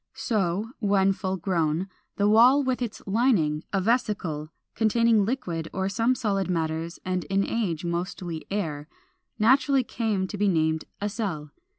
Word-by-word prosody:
So, 210 0 -1
when 195 -2 +3
full 190 -1 -3
grown, 170 -1 0 0.3
the 205 - +2
wall 245 +7 +6
with 255 -1 -1
its 230 -3 -4
lining 195 - +2
a 195 - +1
vesicle, 190 -8 -1 0.2
containing 225 -1 +3
liquid 180 -10 -3
or 190 0 -1
some 230 +5 +1
solid 200 -6 -1
matters 165 -1 -2
and 185 -1 -1
in 195 0 +1
age 180 -8 -2
mostly 170 -1 -4
air 155 -8 -3 0.5
naturally 260 +4 +4
came 220 -5 -1
to 205 - -6
be 205 - +3
named 160 -3 +1
a 205 - -1
Cell. 185 -9 -4
195 Hz, 150 wpm, -26 LUFS, 170-225 Hz, 0.5 s, wall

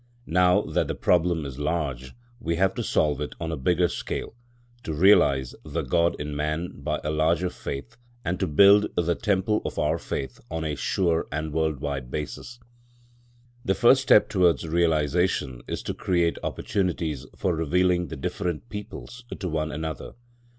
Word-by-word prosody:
Now 90 +3 +4
that - - -1
the - - -3
problem 85 -3 +2
is 70 0 -7
large, 75 -5 -2 0.3
we 85 -6 -1
have 95 +2 +2
to - - -3
solve 75 -2 +1
it 75 -4 -4
on 80 -1 -3
a - - -1
bigger 85 +5 +2
scale, - - -5 0.5
to 80 - -4
realise 70 -8 +4
the - - -3
God 85 -1 +1
in 75 0 -4
man 75 +4 -2
by 75 +2 -1
a 75 - -1
larger 80 +3 +1
faith 70 +2 -7 0.3
and 90 +1 -1
to - - 0
build 100 +7 +6
the 85 0 +2
temple 105 +1 0
of - - -5
our 80 +2 +1
faith 70 -2 -5
on 80 0 -3
a 75 - -1
sure 85 +2 0
and 75 +1 -3
world 80 -3 0
wide 70 -4 -3
basis. 75 - -6 1.0
The 95 - +1
first 125 +6 +5
step 120 -5 +5
towards 85 - +2
realisation 80 -4 +1
is - - -4
to - - -3
create 85 -2 0
opportunities 80 -8 -2
for 90 -3 0
revealing 90 +2 +1
the - - -6
different 75 -2 -3
peoples 105 - -8 0.2
to 95 - -3
one 80 -2 -2
another. 80 -2 -5
80 Hz, 165 wpm, -25 LUFS, 75-90 Hz, 1.0 s, build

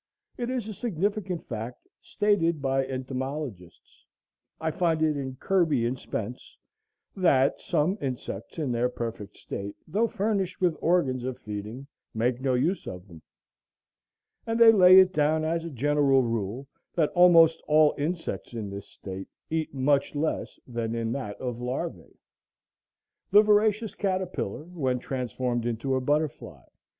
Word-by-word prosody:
It 240 -1 -3
is 250 -4 -2
a 215 - -5
significant 200 -3 -2
fact, 115 +1 -6
stated 170 -6 +1
by 135 -1 0
entomologists, 130 - -6 0.6
I 160 0 -1
find 165 -1 +1
it 155 -1 +2
in 135 -2 -4
Kirby 160 -7 +1
and 125 +2 -2
Spence, 115 +3 -6 0.6
that 140 -8 +3
"some 180 +8 0
insects 125 - -5
in 150 -6 -1
their 120 +1 +1
perfect 115 -4 -6
state, 100 +1 -6
though 215 +8 +1
furnished 200 -4 -1
with 175 -3 +2
organs 140 -8 +2
of 130 0 -4
feeding, 105 +5 -7 0.3
make 120 +3 0
no 130 -1 +1
use 170 +10 0
of 90 +1 -7
them;" 85 -4 -13 1.3
and 225 0 -1
they 230 -1 +9
lay 185 -3 +8
it 185 -1 +5
down 155 0 +2
as 165 +1 -1
"a - - -4
general 140 -1 +3
rule, 115 +3 -3 0.3
that 160 -4 +2
almost 165 -2 +6
all 155 0 +5
insects 160 -4 -4
in 105 -3 -4
this 100 0 -7
state 95 0 -8 0.2
eat 160 -1 -1
much 140 +2 +1
less 155 +2 -2
than 115 -2 -3
in 115 -1 -2
that 120 -6 -4
of 125 -3 -4
larvæ. 125 +1 -4 1.2
The 205 +2 +7
voracious 210 0 +2
caterpillar 185 - -2
when 150 -7 -2
transformed 125 -1 -2
into 120 +3 -2
a 130 - +1
butterfly 145 +2 -2
140 Hz, 145 wpm, -27 LUFS, 120-175 Hz, 1.3 s, they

